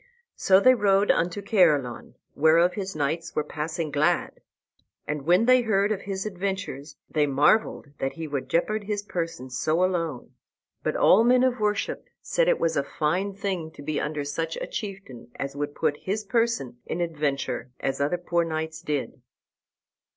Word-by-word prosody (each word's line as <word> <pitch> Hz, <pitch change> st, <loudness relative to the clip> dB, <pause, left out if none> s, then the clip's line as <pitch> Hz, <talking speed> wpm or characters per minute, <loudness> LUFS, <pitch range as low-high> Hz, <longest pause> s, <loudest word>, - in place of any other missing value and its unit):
So 190 Hz, 0 st, +5 dB
they 255 Hz, +5 st, +6 dB
rode 205 Hz, -3 st, +3 dB
unto 180 Hz, +4 st, -1 dB
Caerleon, 155 Hz, -, +2 dB, 0.2 s
whereof 165 Hz, +4 st, +4 dB
his 195 Hz, -3 st, -5 dB
knights 155 Hz, +3 st, -2 dB
were 150 Hz, -, +1 dB
passing 155 Hz, +2 st, -4 dB
glad. 155 Hz, +5 st, 0 dB, 0.6 s
And 150 Hz, 0 st, -4 dB
when 180 Hz, +6 st, +5 dB
they 255 Hz, 0 st, +6 dB
heard 210 Hz, -3 st, +1 dB
of 200 Hz, -2 st, -1 dB
his 195 Hz, 0 st, -4 dB
adventures 185 Hz, -8 st, -4 dB
they 150 Hz, -2 st, +1 dB
marvelled 145 Hz, +4 st, +2 dB
that 135 Hz, -, -2 dB
he 165 Hz, -1 st, -6 dB
would 140 Hz, -3 st, -4 dB
jeopard 205 Hz, +7 st, 0 dB
his 205 Hz, -1 st, -2 dB
person 165 Hz, -9 st, -4 dB
so 155 Hz, +8 st, +1 dB
alone. 165 Hz, -8 st, -2 dB, 0.5 s
But -, -, -1 dB
all 210 Hz, +5 st, +5 dB
men 250 Hz, +1 st, +4 dB
of 255 Hz, -2 st, +1 dB
worship 210 Hz, -1 st, -1 dB
said -, -, 0 dB
it -, -, +3 dB
was 165 Hz, -, +1 dB
a 140 Hz, -, +1 dB
fine 185 Hz, +9 st, -1 dB
thing 190 Hz, -5 st, -3 dB
to 145 Hz, -, -11 dB
be 155 Hz, +1 st, -2 dB
under 150 Hz, -1 st, -2 dB
such 160 Hz, +3 st, -3 dB
a -, -, -3 dB
chieftain 195 Hz, -, -7 dB
as 135 Hz, 0 st, -5 dB
would 145 Hz, 0 st, -4 dB
put 145 Hz, -, 0 dB
his 205 Hz, +6 st, -3 dB
person 210 Hz, -, -1 dB
in 170 Hz, -, -3 dB
adventure 145 Hz, -7 st, -2 dB
as 135 Hz, +1 st, -2 dB
other 150 Hz, +5 st, +1 dB
poor 175 Hz, -1 st, 0 dB
knights 160 Hz, 0 st, -4 dB
did. 145 Hz, -5 st, -3 dB
170 Hz, 170 wpm, -26 LUFS, 145-200 Hz, 0.6 s, they